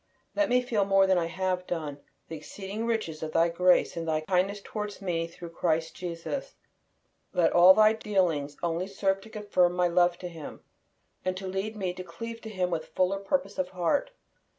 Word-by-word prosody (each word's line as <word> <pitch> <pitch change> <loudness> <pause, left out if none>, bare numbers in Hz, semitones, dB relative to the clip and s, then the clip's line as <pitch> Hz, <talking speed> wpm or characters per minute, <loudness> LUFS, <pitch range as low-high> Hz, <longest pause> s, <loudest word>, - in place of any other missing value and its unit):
Let 305 -1 +2
me 250 +1 +3
feel, 230 -5 +1
more 195 0 +4
than 190 -1 +3
I 165 - -1
have 185 +1 -2
done, 150 -4 -4 0.3
the 165 - -6
exceeding 200 +8 -6
riches 215 -9 -2
of 155 0 -4
Thy 165 +1 +4
grace 180 +2 +3
in 165 -1 -3
Thy 155 -1 0
kindness 190 +4 +1
toward 210 -1 -5
me 170 -4 -1
through 170 0 -10
Christ 165 -1 0
Jesus. 175 +10 -5 0.8
Let 175 - +3
all 180 +2 +8
Thy 215 0 +6
dealings 175 -10 0
only 170 +2 -1
serve 195 0 0
to 220 - -13
confirm 205 -5 +1
my 180 0 +2
love 175 0 +3
to 180 - -6
Him, 165 -4 -9 0.6
and 185 0 -1
to 190 - -6
lead 195 +3 -3
me 190 -4 -2
to 185 - -7
cleave 230 +7 -7
to 220 - -7
Him 185 -4 -1
with 160 -2 -2
fuller 185 +2 +2
purpose 200 -1 -1
of 185 -1 0
heart. 185 - 0
185 Hz, 195 wpm, -28 LUFS, 170-200 Hz, 0.8 s, all